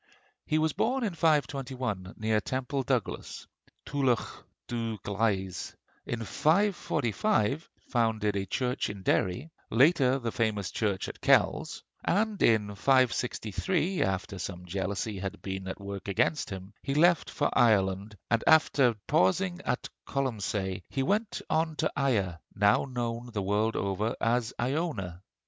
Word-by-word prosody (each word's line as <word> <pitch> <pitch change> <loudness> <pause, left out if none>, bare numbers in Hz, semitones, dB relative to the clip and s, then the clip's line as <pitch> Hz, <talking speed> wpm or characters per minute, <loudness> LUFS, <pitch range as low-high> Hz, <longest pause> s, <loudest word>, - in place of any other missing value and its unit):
He 155 - +2
was 155 -1 +1
born 255 +2 0
in 205 -5 -1
521, 130 - 0
near 110 0 +1
Temple 130 +2 -2
Douglas 125 -4 -2 0.4
(Tulach 135 -5 -1 0.2
Dubh 115 -3 -3
glaise); 100 -3 -1 0.3
in 115 -1 -3
545 155 - +1 0.2
founded 110 -4 +1
a 95 -1 -2
church 125 +6 -1
in 100 -2 -7
Derry; 105 - 0 0.2
later, 135 +1 +4
the 120 -3 -3
famous 110 -4 -1
church 100 -4 -1
at - - -9
Kells; - - +2 0.2
and 210 +1 +1
in 105 -3 +3
563, 130 - +1
after 95 0 -1
some 90 0 -5
jealousy 100 +3 -3
had 95 0 -5
been 95 -1 -4
at 95 - -5
work 100 -1 -6
against 120 +10 +1
him, 95 +1 -7
he 135 - -2
left 170 +1 +4
for - - -1
Ireland, 100 -2 +3
and 115 -1 +3
after 140 -6 +5
pausing 175 - +2
at - - -1 0.2
Colonsay, 105 -8 -2
he 135 - -1
went 210 +8 0
on 160 0 +1
to 155 - 0
Ia, 100 -11 +1 0.2
now 100 +1 +4
known 120 -2 -3
the 105 -3 -2
world 105 +3 +1
over 100 +3 -1
as 115 -1 +1
Iona. 120 - -2
115 Hz, 135 wpm, -29 LUFS, 100-140 Hz, 0.4 s, after